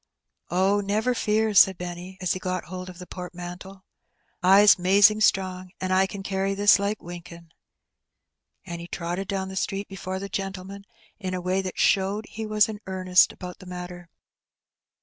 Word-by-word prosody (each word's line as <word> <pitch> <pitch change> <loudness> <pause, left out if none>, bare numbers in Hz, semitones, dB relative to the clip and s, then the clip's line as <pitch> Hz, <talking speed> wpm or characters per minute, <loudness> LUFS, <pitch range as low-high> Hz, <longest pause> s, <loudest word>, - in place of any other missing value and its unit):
"Oh, 190 +4 +2
never 215 +5 0
fear," 220 -1 +1
said 190 -1 +6
Benny, 180 +1 -7
as 185 -1 0
he 185 - -5
got 185 -1 -3
hold 185 +2 -7
of 180 - -11
the 180 - -9
portmanteau. 180 +2 -9 0.6
"I^s 195 +2 +7
'mazing 200 +4 +5
strong, 185 -3 +1
and 185 0 -1
I 190 +1 +4
ken 195 0 -7
carry 195 0 -1
this 205 0 +5
like 200 +2 -2
winkin'." 170 -1 -10 1.1
And 170 -2 -6
he 170 - -8
trotted 175 +3 -4
down 190 -1 -3
the 190 - -8
street 195 +1 -2
before 190 -1 -5
the 200 +1 -5
gentleman 195 0 -6 0.3
in 185 -3 -3
a - - -2
way 185 +2 0
that 185 -1 -6
showed 200 +2 +2
he 220 0 -6
was 215 -1 +3
in 215 -2 -6
earnest 185 -1 +3
about 180 -1 -9
the 185 - -13
matter. 180 -1 -8
190 Hz, 170 wpm, -25 LUFS, 180-200 Hz, 1.1 s, I^s